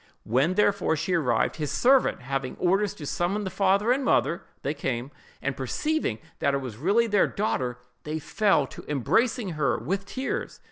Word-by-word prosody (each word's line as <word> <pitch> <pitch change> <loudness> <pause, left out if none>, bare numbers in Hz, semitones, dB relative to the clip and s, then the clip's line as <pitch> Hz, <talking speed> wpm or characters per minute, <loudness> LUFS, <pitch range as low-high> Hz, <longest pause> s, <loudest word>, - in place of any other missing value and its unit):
When, 135 +11 +1
therefore, 200 -5 +2
she 165 +4 -2
arrived, 125 -9 +1
his 150 -3 -2
servant 260 - +3
having 135 0 -3
had - - -4
orders 195 +2 +2
to 150 - -8
summon 180 +8 -1
the 190 - -4
father 200 +3 +2
and 270 +2 +2
mother, 170 -8 +2 0.2
they 140 - 0
came; 135 -2 -3 0.3
and 140 -1 -1
perceiving 135 - -1 0.2
that 140 - +2
it - - 0
was 125 -6 -7
really 200 - +3
their 205 -3 +3
daughter, 130 - -1 0.2
they 155 +3 -4
fell 190 -1 +2
to - - -11
embracing 220 - +1
her, 150 -7 0
with 195 - -3
tears. 265 +1 -4
170 Hz, 180 wpm, -26 LUFS, 135-205 Hz, 0.3 s, servant